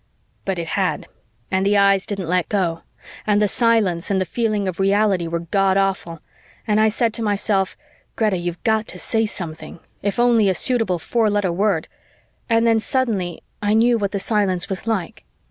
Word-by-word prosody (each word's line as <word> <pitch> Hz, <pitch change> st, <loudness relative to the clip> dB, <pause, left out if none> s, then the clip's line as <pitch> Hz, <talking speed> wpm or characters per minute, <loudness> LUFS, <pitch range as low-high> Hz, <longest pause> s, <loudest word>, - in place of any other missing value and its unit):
But 195 Hz, -2 st, -1 dB
it 165 Hz, -1 st, -4 dB
had, -, -, -1 dB, 0.5 s
and 190 Hz, 0 st, +1 dB
the 205 Hz, +1 st, +3 dB
eyes 195 Hz, -1 st, +3 dB
didn't 195 Hz, -4 st, -4 dB
let 180 Hz, 0 st, 0 dB
go, 175 Hz, -5 st, 0 dB, 0.5 s
and 205 Hz, -1 st, +3 dB
the 210 Hz, -, +3 dB
silence 210 Hz, -7 st, +1 dB
and 195 Hz, -1 st, +1 dB
the 185 Hz, -, 0 dB
feeling 215 Hz, -2 st, -1 dB
of 185 Hz, 0 st, -4 dB
reality 195 Hz, -2 st, +2 dB
were 170 Hz, 0 st, -2 dB
Godawful, 190 Hz, -2 st, 0 dB, 0.4 s
and 210 Hz, -1 st, +2 dB
I 220 Hz, 0 st, +4 dB
said 230 Hz, +1 st, 0 dB
to 230 Hz, -, -4 dB
myself, 205 Hz, -2 st, 0 dB, 0.4 s
"Greta, 215 Hz, -4 st, +1 dB
you've 175 Hz, 0 st, -5 dB
got 220 Hz, -2 st, +1 dB
to -, -, -8 dB
say 225 Hz, -2 st, 0 dB
something, 165 Hz, -4 st, -7 dB, 0.2 s
if 200 Hz, +2 st, -2 dB
only 235 Hz, -4 st, +4 dB
a 190 Hz, -, +1 dB
suitable 225 Hz, -7 st, +1 dB
four 225 Hz, +5 st, 0 dB
letter 205 Hz, -3 st, 0 dB
word," 185 Hz, -2 st, 0 dB, 0.6 s
and 230 Hz, 0 st, +3 dB
then 225 Hz, -1 st, +4 dB
suddenly 215 Hz, -9 st, -1 dB, 0.2 s
I 210 Hz, +1 st, +2 dB
knew 235 Hz, +1 st, +4 dB
what 200 Hz, -1 st, -1 dB
the 200 Hz, -, -2 dB
silence 195 Hz, -3 st, 0 dB
was 195 Hz, +2 st, -4 dB
like. 205 Hz, -7 st, -2 dB
200 Hz, 180 wpm, -21 LUFS, 185-220 Hz, 0.6 s, I